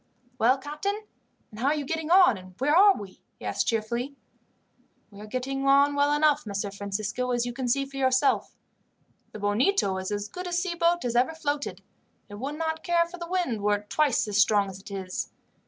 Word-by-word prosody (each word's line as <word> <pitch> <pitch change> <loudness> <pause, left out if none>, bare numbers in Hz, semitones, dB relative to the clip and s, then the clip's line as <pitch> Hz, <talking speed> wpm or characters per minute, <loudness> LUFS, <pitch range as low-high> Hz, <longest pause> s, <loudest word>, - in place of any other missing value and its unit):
"Well, 250 +4 +4
captain, 300 +9 -3 0.5
and 215 - -11
how 255 - 0
are 295 - +3
you 295 -2 -3
getting 320 +2 -3
on, 360 - +6
and 185 -1 -12
where 295 +6 +2
are 395 +2 +7
we?" 195 -2 -10 0.2
he - - -11
asked, - - -1
cheerfully. 235 +5 -1 1.0
"We 200 0 -12
are 210 - -9
getting 270 +4 -3
on 280 +1 +5
well 285 0 +2
enough, 295 0 +3
Messer 200 0 -3
Francisco, 205 +5 -3
as 240 -1 +1
you 245 - -4
can 260 0 -3
see 275 +3 +1
for 275 0 -10
yourself. 260 +1 +2 0.8
The - - -8
Bonito 205 - +1
is 190 - -4
as 205 0 -3
good 360 - -7
a 350 - -4
sea 355 0 0
boat 340 -2 +1
as 240 -1 -1
ever 255 +7 +2
floated, 290 -2 -3 0.5
and 205 +2 -8
would 285 +3 -3
not 320 0 -2
care 340 -1 +2
for 350 +1 -11
the 340 0 -6
wind 350 - -1
were 205 0 +2
it 205 0 -9
twice 285 -7 +2
as 205 0 0
strong 200 -1 +3
as 190 - -10
it 195 - -12
is. 190 -2 -4
265 Hz, 210 wpm, -27 LUFS, 210-310 Hz, 1.0 s, are